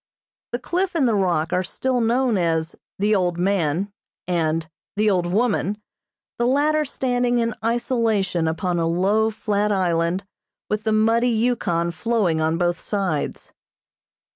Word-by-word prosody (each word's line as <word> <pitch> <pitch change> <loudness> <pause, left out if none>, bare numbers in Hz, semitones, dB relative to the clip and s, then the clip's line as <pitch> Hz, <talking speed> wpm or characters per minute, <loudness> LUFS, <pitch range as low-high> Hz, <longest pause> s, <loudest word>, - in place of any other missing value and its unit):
The 240 - -1
cliff 365 +7 -2
and 285 -6 +3
the 230 - +2
rock 175 -4 +1
are 180 - +2
still 255 +6 -1
known 240 +1 +2
as 165 -3 0 0.2
"the 210 +2 +2
old 180 -4 +1
man" 185 0 0 0.3
and 165 -2 0 0.3
"the 210 +1 +3
old 180 -2 +1
woman," 210 +1 0 0.6
the 240 - +2
latter 300 +3 +2
standing 245 -2 0
in 230 -1 0
isolation 225 -7 0
upon 170 +2 -1
a 165 - +1
low, 200 +6 +2
flat 210 -1 -1
island 180 -1 0 0.5
with 210 +1 -1
the 220 - +2
muddy 225 +3 +3
Yukon 220 -8 0
flowing 180 -3 0
on 160 +1 +1
both 175 -1 0
sides. 190 -8 -3
200 Hz, 140 wpm, -22 LUFS, 175-235 Hz, 0.6 s, and